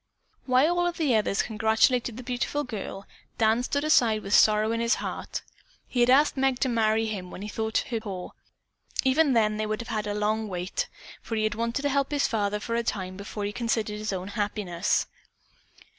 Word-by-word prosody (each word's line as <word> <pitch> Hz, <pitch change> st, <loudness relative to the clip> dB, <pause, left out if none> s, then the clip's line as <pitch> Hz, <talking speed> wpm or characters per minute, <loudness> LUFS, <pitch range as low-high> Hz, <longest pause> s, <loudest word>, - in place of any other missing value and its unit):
While 285 Hz, +8 st, +3 dB
all 350 Hz, -, +2 dB
of 345 Hz, -, -3 dB
the 300 Hz, -6 st, +2 dB
others 210 Hz, -2 st, +1 dB
congratulated 220 Hz, +2 st, +2 dB
the 255 Hz, -, -7 dB
beautiful 250 Hz, +4 st, -2 dB
girl, 200 Hz, -4 st, -6 dB, 0.3 s
Dan 225 Hz, +1 st, +3 dB
stood 285 Hz, +3 st, -1 dB
aside 235 Hz, -8 st, +3 dB
with 195 Hz, -, -3 dB
sorrow 215 Hz, +1 st, +5 dB
in 230 Hz, -, -1 dB
his 235 Hz, 0 st, +2 dB
heart. -, -, -5 dB, 0.4 s
He 250 Hz, -, -3 dB
had 240 Hz, 0 st, +4 dB
asked 285 Hz, +4 st, +5 dB
Meg 265 Hz, -1 st, +1 dB
to 260 Hz, -, +2 dB
marry 225 Hz, -1 st, +2 dB
him 195 Hz, -5 st, -4 dB
when 185 Hz, -, -8 dB
he -, -, -5 dB
thought 220 Hz, +1 st, -1 dB
her 230 Hz, -, 0 dB
poor. 195 Hz, -5 st, -7 dB, 0.7 s
Even 275 Hz, +2 st, +3 dB
then 215 Hz, -2 st, +2 dB
they 215 Hz, 0 st, -1 dB
would 215 Hz, 0 st, -2 dB
have 235 Hz, -, -7 dB
had 215 Hz, -1 st, -2 dB
a 205 Hz, -, -2 dB
long 215 Hz, +1 st, 0 dB
wait, 180 Hz, -1 st, -3 dB, 0.3 s
for 225 Hz, -, -4 dB
he 215 Hz, -, 0 dB
had 215 Hz, -1 st, +1 dB
wanted 230 Hz, +5 st, -2 dB
to 285 Hz, -, +2 dB
help 275 Hz, 0 st, +1 dB
his 290 Hz, -1 st, +1 dB
father 210 Hz, -2 st, -1 dB
for 230 Hz, -, -4 dB
a 235 Hz, -, +2 dB
time 190 Hz, -5 st, -3 dB
before 200 Hz, +1 st, -5 dB
he 205 Hz, -, -2 dB
considered 220 Hz, -3 st, -1 dB
his 215 Hz, 0 st, -3 dB
own 190 Hz, 0 st, -4 dB
happiness. 205 Hz, -4 st, -1 dB
220 Hz, 205 wpm, -27 LUFS, 210-250 Hz, 0.7 s, sorrow